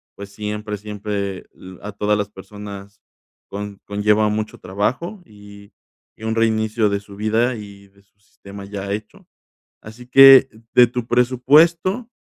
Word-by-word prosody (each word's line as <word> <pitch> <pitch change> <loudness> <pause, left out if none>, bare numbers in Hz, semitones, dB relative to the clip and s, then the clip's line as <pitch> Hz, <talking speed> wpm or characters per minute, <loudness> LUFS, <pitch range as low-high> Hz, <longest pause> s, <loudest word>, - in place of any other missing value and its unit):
pues, 100 0 -10
siempre 105 0 -5
siempre, 100 -2 -4 0.2
eh, 95 -1 -13
a 105 0 -7
todas 105 +1 0
las 105 -1 -2
personas 100 0 -11 0.5
con 100 0 -7
conlleva 105 +1 +1
mucho 110 0 -3
trabajo 130 - -3
y 100 -2 -15 0.5
y - - -14
un 110 0 -1
reinicio 110 -1 +1
de 100 0 -1
su 100 0 -14
vida 110 +4 0
y 100 -2 -11
de 100 0 -27
su 100 0 -43
sistema 100 -1 -12
ya 100 0 -6
hecho. 105 +1 -7 0.6
Así 115 +3 -12
que 135 0 +8 0.2
de 125 - +7
tu 120 0 -5
presupuesto, 155 - +2
105 Hz, 145 wpm, -20 LUFS, 100-115 Hz, 0.6 s, que